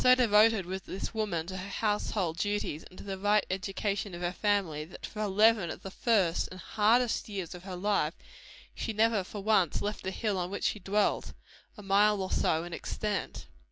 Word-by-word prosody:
So 255 Hz, 0 st, +7 dB
devoted 220 Hz, -4 st, +4 dB
was 190 Hz, +2 st, -4 dB
this 190 Hz, -, -5 dB
woman 200 Hz, -7 st, -1 dB
to 190 Hz, +2 st, -6 dB
her 185 Hz, +2 st, -6 dB
household 205 Hz, -5 st, -1 dB
duties, 205 Hz, -6 st, -1 dB
and 185 Hz, -, -16 dB
to -, -, -9 dB
the 195 Hz, -1 st, -5 dB
right 205 Hz, +1 st, +3 dB
education 195 Hz, 0 st, -2 dB
of 175 Hz, -, -8 dB
her 175 Hz, -, 0 dB
family, 190 Hz, -7 st, 0 dB
that 160 Hz, -, -9 dB
for 215 Hz, -, -6 dB
eleven 210 Hz, -2 st, +4 dB
of -, -, -7 dB
the 195 Hz, -, -6 dB
first 195 Hz, -7 st, +2 dB
and 185 Hz, -, -10 dB
hardest 225 Hz, +6 st, +2 dB
years 190 Hz, -5 st, -4 dB
of 180 Hz, +1 st, -10 dB
her 190 Hz, -2 st, -5 dB
life, 180 Hz, -4 st, 0 dB, 0.6 s
she 225 Hz, -, -3 dB
never 220 Hz, -1 st, +2 dB
for 200 Hz, +2 st, -8 dB
once 195 Hz, -6 st, +3 dB
left 205 Hz, +1 st, -3 dB
the 190 Hz, -, -2 dB
hill 200 Hz, 0 st, -1 dB
on 175 Hz, 0 st, -2 dB
which 200 Hz, -, -5 dB
she 210 Hz, -, 0 dB
dwelt 200 Hz, +2 st, 0 dB, 0.4 s
a 210 Hz, -, -10 dB
mile 205 Hz, +1 st, +4 dB
or 190 Hz, 0 st, -3 dB
so 160 Hz, +1 st, +1 dB
in 175 Hz, 0 st, -7 dB
extent. 210 Hz, +3 st, -3 dB
200 Hz, 200 wpm, -30 LUFS, 185-210 Hz, 0.6 s, So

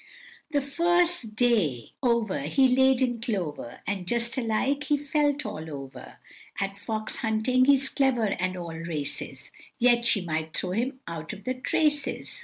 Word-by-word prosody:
The 290 Hz, -2 st, +1 dB
first 340 Hz, -4 st, +1 dB
day 205 Hz, -, +1 dB
over 235 Hz, -, +1 dB
he 165 Hz, -, +3 dB
laid 265 Hz, 0 st, +4 dB
in 240 Hz, -3 st, -1 dB
clover, 175 Hz, -, -3 dB
And 195 Hz, -3 st, -3 dB
just 235 Hz, +3 st, +1 dB
alike 260 Hz, +4 st, 0 dB
he 295 Hz, 0 st, +2 dB
felt 290 Hz, -1 st, 0 dB
all 160 Hz, -7 st, -5 dB
over; 135 Hz, -3 st, -9 dB, 0.4 s
At 195 Hz, 0 st, -3 dB
fox 215 Hz, +1 st, -3 dB
hunting 230 Hz, +3 st, +2 dB
he's 275 Hz, -1 st, +4 dB
clever 265 Hz, -5 st, +2 dB
and 185 Hz, -2 st, -1 dB
all 170 Hz, -2 st, -6 dB
races, 160 Hz, -3 st, -5 dB, 0.3 s
Yet 240 Hz, -1 st, +4 dB
she 220 Hz, -3 st, +4 dB
might 160 Hz, -1 st, -3 dB
throw 180 Hz, -, -2 dB
him 255 Hz, +7 st, -1 dB
out 165 Hz, +2 st, -5 dB
of 200 Hz, -1 st, -10 dB
the 255 Hz, -, -1 dB
traces. 295 Hz, -, -1 dB
230 Hz, 155 wpm, -27 LUFS, 185-265 Hz, 0.4 s, laid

